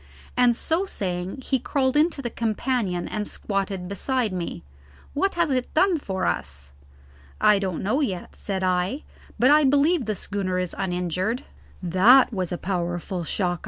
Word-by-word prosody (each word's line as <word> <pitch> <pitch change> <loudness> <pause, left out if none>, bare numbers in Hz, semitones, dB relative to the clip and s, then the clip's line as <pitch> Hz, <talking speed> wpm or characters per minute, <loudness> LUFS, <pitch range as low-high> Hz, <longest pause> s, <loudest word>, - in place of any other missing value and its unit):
and 245 -1 +4
so 325 +9 0
saying 185 - -4
he 265 0 0
crawled 260 +1 0
into 300 -2 +2
the 240 - -2
companion 220 -5 -1
and 210 -1 -3
squatted 195 -2 -3
beside 225 +2 -1
me. 170 - -4 0.5
"What 390 +7 0
has 340 -4 +1
it 255 -1 -1
done 360 0 +4
for 190 -8 -3
us?" 70 +1 -3 0.7
"I 210 -1 +5
don't 190 -4 -3
know 250 +10 +1
yet," 190 -11 -3
said 190 -2 -3
I; 185 +9 0 0.3
"but 255 +3 +5
I 300 +1 +6
believe 285 +2 +3
the 215 0 -1
schooner 190 -1 -2
is 180 -1 -2
uninjured. 185 - -1 0.4
That 215 +9 +6
was 185 -4 -2
a 175 - -2
powerful 175 -1 -3
shock!" 175 0 -1
200 Hz, 160 wpm, -24 LUFS, 180-265 Hz, 0.7 s, I